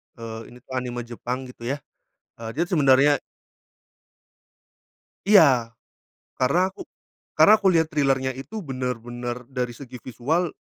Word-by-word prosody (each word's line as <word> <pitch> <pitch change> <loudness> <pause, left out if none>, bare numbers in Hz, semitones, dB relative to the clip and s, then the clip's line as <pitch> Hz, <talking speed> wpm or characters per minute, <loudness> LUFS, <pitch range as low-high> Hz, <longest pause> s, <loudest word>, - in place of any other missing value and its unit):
eee, 115 -1 -7
ini 125 - -14
tu - - -40
anime 125 -1 -3
Jepang, 120 +2 -5
gitu 120 -1 -9
ya. 140 +1 -3 0.6
Eee, 115 - -5
dia 170 - +2
sebenarnya 145 -3 +5 2.1
Iya. 130 - +5 0.7
Karena 170 +9 +3
aku - - -12 0.6
karena 215 - +8
aku 195 - +2
lihat 165 -3 +3
trailer-nya 135 -3 +1
itu, 190 - -7
bener-bener 125 -2 -4
dari 125 -2 -3
segi 125 -1 -10
visual, 155 +8 -1
130 Hz, 125 wpm, -24 LUFS, 120-150 Hz, 2.1 s, karena